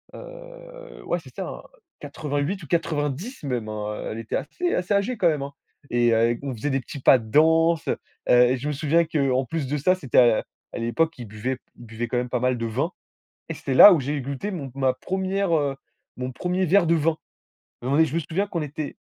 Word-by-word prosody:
heu, - - -12
ouais, - - 0
c'est - - -15
ça, - - -4
hein, - - -7 0.4
88 145 +5 -3
ou - - -10
90 165 - -2
même, 125 -6 -2
hein, 105 0 -4
heu, - - -5
elle 110 - -5
était 115 - -4
assez 355 0 -3
assez 180 +3 0
âgée 205 +4 0
quand 180 - +3
même, 150 -4 +1
hein. 140 +1 -5 0.4
Et 120 -1 +3
heu, 115 +1 +2
on 135 -2 -3
faisait 115 +6 -3
des 135 -1 +1
petits 135 +2 -8
pas 130 - +7
de 110 -2 -9
danse. 160 +4 +3 0.4
Heu, 125 +1 +5
je 140 +4 -5
me - - 0
souviens 155 +4 +2
qu'en 135 -5 +1
plus 150 0 -3
de 150 - -1
ça, 185 +6 +3
c'était 145 -10 +2
à 120 -3 +4 0.3
à - - -4
l'époque 120 +8 +1
ils 120 - -7
buvaient 110 +5 -4 0.2
ils 120 - -12
buvaient 115 +1 -5
quand 125 - -4
même 125 0 -2
pas 125 - -1
mal 125 0 +1
de 115 - -3
vin. 130 +10 -1 0.6
Et - - -2
c'était - - -3
là 205 - +10
où 165 - +2
j'ai 145 +2 -2
goûté 140 +10 -4
mon 145 -7 -5
ma 135 -1 +2
1re, 190 +4 -1
heu, 140 -2 -1 0.4
mon 125 0 -4
1er 180 +6 -1
verre 185 +2 +4
de 170 - +4
vin. 160 +1 +1 0.7
Non 130 +2 -2
mais, 160 +3 +5
je 155 - -5
me - - +2
souviens 180 +6 -2
qu'on 175 -4 -3
était, 150 0 -5
145 Hz, 225 wpm, -24 LUFS, 125-170 Hz, 0.7 s, là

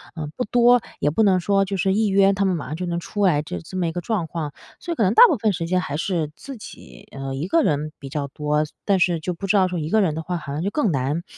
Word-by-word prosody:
呃， 155 -2 -4
不 250 - -1
多， 245 +1 +4 0.2
也 145 - +2
不 220 +9 +2
能 190 -3 +4
说 195 +2 +2
就 195 0 -3
是 190 +1 +1
一 215 +1 +2
约 195 0 +4
他 200 0 0
们 185 -2 +1
马 150 - -5
上 150 - -4
就 180 +2 -4
能 170 0 -2
出 205 +4 -3
来 150 -5 +3
这 90 - -6
这 185 - -8
么 175 -2 0
一 - - -1
个 175 +1 -4
状 195 -3 -1
况， 155 -3 -4 0.3
所 345 - -6
以 - - -1
可 225 - +1
能 190 +3 +3
大 - - +9
部 - - +1
分 215 0 +1
时 165 0 -3
间 185 +1 +1
还 145 -2 -4
是 165 -3 -1
自 270 -3 -9
己， 60 - -13
呃， 135 -1 -5
一 155 +6 -3
个 330 +10 +3
人 150 0 0
比 135 -2 -8
较 140 0 -3
多。 150 +2 -1
所 - - -16
但 195 -2 +2
是 175 -2 +2
就 180 +3 -3
不 195 +4 -6
知 205 - +2
道 185 -1 +4
说 180 -2 -3
一 155 +1 -3
个 220 +1 +3
人 160 -5 +1
的 160 - -3
话， 175 +2 -3
好 140 -3 -7
像 150 - -3
就 200 - 0
更 220 - 0
难 140 +5 -1
175 Hz, 340 characters per minute, -22 LUFS, 150-200 Hz, 0.3 s, 大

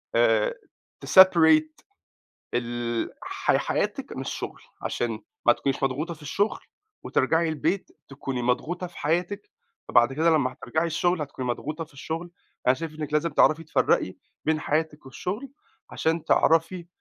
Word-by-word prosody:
آآ 115 -2 +3 0.5
تseparate 160 -4 +6 0.7
ال 120 -1 -2
حي - - +1
حياتِك - - -2
من - - -4
الشغل - - -5 0.2
عشان 115 -3 -2 0.3
ما 120 - +8
تكونيش 135 +2 -2
مضغوطة 145 +6 -1
في 150 - -18
الشغل 200 +9 0 0.4
وترجعي 165 0 +1
البيت 160 +5 -1 0.2
تكوني 135 -2 -4
مضغوطة 155 +9 -1
في 175 - -13
حياتِك، 175 +7 -1 0.4
فبعد 120 +2 +4
كده 160 +4 +3
لمّا 140 -5 +2
هترجعي 160 +4 -2
الشغل 170 0 +1
هتكوني 130 -3 -5
مضغوطة 155 +6 -3
في 155 - -23
الشغل، 165 +5 -5 0.3
فأنا 125 - +5
شايف 160 +1 -6
إنِّك 150 0 -4
لازم 155 +2 +1
تعرفي 160 +1 +3
تفرقي 160 - +1 0.3
بين 155 -1 +1
حياتِك 155 -1 -1
والشغل 200 - -5 0.4
عشان 160 0 -1
تعرفي 165 +2 +2
155 Hz, 140 wpm, -26 LUFS, 135-170 Hz, 0.7 s, ما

